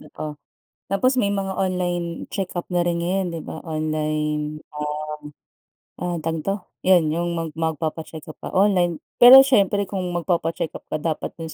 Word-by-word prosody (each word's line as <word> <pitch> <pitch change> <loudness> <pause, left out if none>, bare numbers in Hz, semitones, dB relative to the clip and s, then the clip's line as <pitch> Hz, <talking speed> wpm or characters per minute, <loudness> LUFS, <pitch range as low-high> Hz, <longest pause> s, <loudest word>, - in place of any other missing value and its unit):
totoo. 150 -1 -8 0.5
Tapos 255 +7 +1
may 200 -3 +2
mga 195 -1 -3
online 175 -2 -2
check-up 185 -3 -3
na 175 -1 +1
rin 170 -1 0
ngayon 185 +2 0
'di 165 - -4
ba - - -7
online 155 -1 -2
um 150 0 -4 1.2
ah, 175 -1 -1
tawag 165 0 -2
dito, 195 +5 -1 0.3
yun 175 -5 +4
yung 175 +1 -1
mag 165 -2 -4
magpapa-check 160 0 -3
up 155 - -9
ka - - -5
online 185 -4 +2 0.2
pero 265 +2 +11
siyempre 200 -6 +3
kung 190 0 -4 0.2
magpapa-check-up 165 -2 -2
ka - - -1
dapat 155 +1 -3
dun 160 -1 -6
170 Hz, 155 wpm, -23 LUFS, 155-190 Hz, 1.2 s, pero